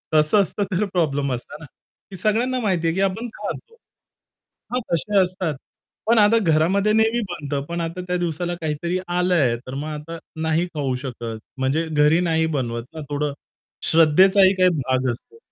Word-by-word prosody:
तसं 155 +7 +5
असतं 200 +2 -2
तर 190 +3 +1
प्रॉब्लेम 145 -6 0
असता 125 +3 -7
ना, 160 - -10 0.5
की 190 - -7
सगळ्यांना 230 +7 +1
माहिती 185 -7 0
आहे, 165 - +1
की 190 - 0
आपण 195 +5 0
खातो. 460 - -6 1.0
हां. 250 - +1
तसे 205 +5 +1
असतात. 180 -4 -1 0.5
पण 230 0 +5
आता 210 +2 +5
घरामध्ये 195 +7 +2
नेहमी 220 +2 +3
बनतं, 145 -4 -3
पण 170 0 -2
आता 170 +2 -4
त्या 180 0 0
दिवसाला 175 0 -2
काहीतरी 165 +3 -2
आलं 180 +1 +1
आहे, 130 -7 +3
तर 130 +2 -10
मग 145 +3 -4
आता 155 +2 -7 0.2
नाही 160 +2 +1
खाऊ 135 -4 -1
शकत. 115 -3 -5 0.2
म्हणजे 135 +5 0
घरी 150 +2 +4
नाही 160 0 +2
बनवत 120 -2 -2
ना 160 - -6
थोडं 145 0 -1 0.6
श्रद्धेचाही 185 +5 +6
काही 185 -1 +4 0.2
भाग 130 0 +1
असतो. 125 - -10
165 Hz, 170 wpm, -22 LUFS, 150-190 Hz, 1.0 s, श्रद्धेचाही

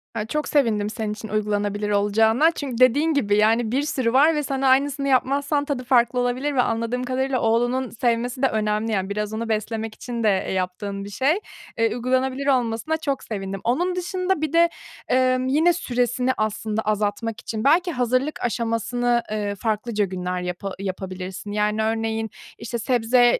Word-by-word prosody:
Ya 215 -2 -2
çok 300 +6 -2
sevindim 220 -8 +1
senin 215 -1 -3
için 215 +1 -8
uygulanabilir 205 0 -1
olacağına 220 +8 +3
çünkü 275 -7 -5
dediğin 280 +6 +4
gibi, 205 -8 +2
yani, 220 +1 +3
bir 270 +3 +1
sürü 260 -5 -1
var 300 +5 +5
ve 300 - 0
sen 270 -1 -2
aynısını 275 +1 +2
yapmazsan 280 +2 +1
tadı 280 -3 -3
farklı 250 -1 +3
olabilir 255 +4 -1
ve 250 - +4
anladığım 230 +1 -1
kadarıyla 260 +1 -1
oğlunun 245 +3 +1
sevmesi 240 +2 -1
de 270 - +5
önemli, 215 0 -1
yani, 190 -2 -1
biraz 210 +1 -3
onu 225 +1 -3
beslemek 220 0 -2
için 235 -2 -5
de, 215 - +4 0.2
eee, - - -2
yaptığın 195 +2 -3
bir - - -7
şey. 270 - +1 0.4
Iıı, 225 0 +3
uygulanabilir 260 +2 0
olmasına 250 +3 +1
çok 280 -4 -2
sevindim. 195 -3 -5
Onun 350 +10 0
dışında 365 -1 -1
bir 310 -1 -2
de, 335 0 +5 0.4
ımm, 255 0 +2
yine 315 +6 +4
süresini 250 -4 0
aslında 215 0 -1
azaltmak 215 +2 -1
için 220 -3 -4
belki 350 +6 +4
hazırlık 255 +2 0
aşamasını, 235 +1 0
eee, 205 -1 -2
farklıca 215 0 -1
günler 180 -1 -3
yapa 180 +2 -4
yapabilirsin. 190 0 -5
Yani 210 +1 0
örneğin, 225 0 -1 0.3
işte, 235 0 -4
sebze 245 +1 +3
235 Hz, 165 wpm, -23 LUFS, 215-265 Hz, 0.4 s, var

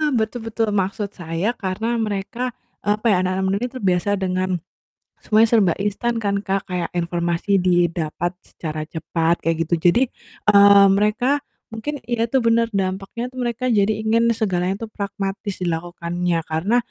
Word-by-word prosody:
eee, - - +1
betul 220 +2 -2
betul. 225 0 -1
Maksud 200 +1 -1
saya 165 +4 -2
karena 190 +4 -2
mereka, 220 +4 -2 0.3
eee, 205 - +3
apa 215 +3 -5
ya, 200 - +4
anak-anak 185 +1 0
muda 195 +1 +1
ini 250 - -3
terbiasa 195 -5 0
dengan 185 0 0 0.7
semuanya 220 +1 +4
serba 200 -8 +4
instan 210 +4 -1
kan 200 -1 +1
Kak, 195 0 0
kayak 180 -2 -2
informasi 175 +3 0
didapat 175 -2 +1
secara 155 -1 -5
cepat 165 +1 0
kayak 165 0 +1
gitu. 170 - +2 0.2
Jadi, 240 +8 +2 0.5
eee, 200 -1 +8
mereka 215 +8 +2 0.3
mungkin 270 +6 -5
ya 235 -1 +1
itu 235 +3 +1
bener, 230 0 +3
dampaknya 195 +5 -2
tuh, 255 - -11
mereka 240 +2 -1
jadi 210 -2 +3
ingin 230 +2 +3
segalanya 185 -4 0
tuh - - -31
pragmatis 200 -1 -4
dilakukannya 175 0 -2
karena, 170 +9 +1
200 Hz, 155 wpm, -21 LUFS, 175-225 Hz, 0.7 s, eee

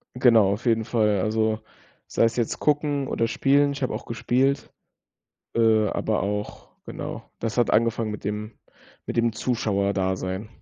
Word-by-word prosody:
Genau, 115 -5 +5
auf 105 +5 -4
jeden 115 -1 +2
Fall. 105 -3 +1
Also 110 +2 0 0.5
sei - - +1
es 115 0 +1
jetzt 120 -3 -1
gucken 145 -2 +1
oder 115 - 0
spielen. 140 +3 +3
Ich 140 - -7
habe 130 - -1
auch - - -5
gespielt, 130 +4 0 0.8
äh, 110 -2 +4
aber - - -1
auch 105 +1 -4 0.2
genau, - - -7
das 115 +1 -3
hat 120 - +3
angefangen 115 0 +1
mit 105 - -7
dem 105 +2 -4 0.5
mit - - -4
dem 115 0 +2
Zuschauerdasein. 100 -4 -1
115 Hz, 155 wpm, -25 LUFS, 105-120 Hz, 0.8 s, Genau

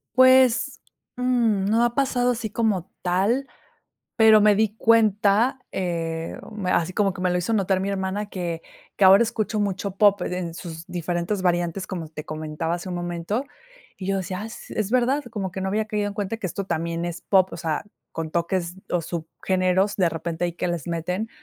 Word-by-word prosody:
Pues, 260 0 +5 0.4
mmm, 240 -6 +2
no 225 +4 +3
ha 240 0 +1
pasado 250 -3 +2
así 230 -2 -3
como 210 -5 -1
tal, 200 +10 +1 0.7
pero 220 -1 +7
me 210 0 +5
di 215 0 +1
cuenta, 220 +2 +3
eh, 165 -3 -3 0.3
así 175 0 +1
como 200 -1 +1
que 185 - -7
me 180 - +2
lo 180 - +1
hizo 180 +6 -1
notar 195 -3 +2
mi 195 +1 -2
hermana 195 +1 -2
que, 170 -4 -4 0.3
que - - +1
ahora 195 +4 +8
escucho 220 -2 -2
mucho 195 -1 -2
pop 200 -2 +5
en 180 -2 -3
sus 165 -1 -8
diferentes 175 +3 -2
variantes, 175 0 0
como 170 -4 -5
te 155 0 -8
comentaba 155 +2 -3
hace 175 +2 -7
un 180 - -3
momento 175 +6 -2 0.5
y 190 - -6
yo 195 0 +1
decía, 185 0 -4
ah, - - -4
es 215 -2 -5
verdad, 255 +3 +2
como 195 -5 -3
que 190 - -5
no 190 - -1
había 215 +2 0
caído 210 -1 -1
en 205 - -5
cuenta 205 +1 -3
que 205 - -3
esto 195 +3 -4
también 170 -1 -2
es 175 0 -5
pop, 190 -2 +3
o - - -6
sea, 160 -2 -2 0.3
con 165 -1 -4
toques 170 +1 -1
o 175 - +1
subgéneros 185 +4 0
de 180 -4 +3
repente, 165 +1 -3
ahí 175 - -3
que 175 - -2
les 170 -3 -3
meten, 180 +6 -2
190 Hz, 190 wpm, -24 LUFS, 175-215 Hz, 0.7 s, ahora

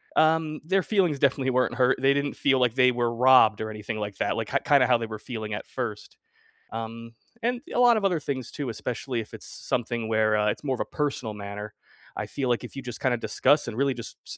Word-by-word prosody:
um, 155 -1 +2
their 190 +1 +2
feelings 180 -9 +1
definitely 135 -1 +2
weren't 125 -2 +1
hurt, 125 0 +3
they 135 +1 +5
didn't 140 0 -1
feel 135 -2 +2
like 125 -1 +2
they 125 -1 +5
were 120 -1 0
robbed 120 -4 +6
or 110 0 -3
anything 105 +1 -5
like 105 -1 -5
that, - - -1
like, - - -2
k - - +1
kinda 140 -3 +5
how - - +5
they 115 - -4
were 110 -1 -6
feeling 110 -3 -6
at - - -6
first. 115 -5 -5 0.6
Um, 115 +1 -6 0.3
and 245 0 0
a - - -1
lot 240 -2 +6
of 205 - -1
other 180 -4 +2
things 130 -4 -4
too, 140 -4 -5
especially 120 +2 -3
if 110 - -9
it's - - -10
s - - -10
something 120 -2 -1
where, 110 -1 +2
uh, 105 0 +2
it's - - -6
more 135 -2 0
of - - -6
a - - +1
personal 140 -7 -3
manner. 105 +1 -7 0.4
I - - -3
feel 135 -3 -3
like 120 0 0
if - - -9
you 135 - -6
just 125 -2 -7
kinda 125 -2 +2
discuss, 115 +7 +2
and 110 - -5
really 135 0 +1
just 115 - -8
s - - -7
125 Hz, 245 wpm, -26 LUFS, 110-140 Hz, 0.6 s, robbed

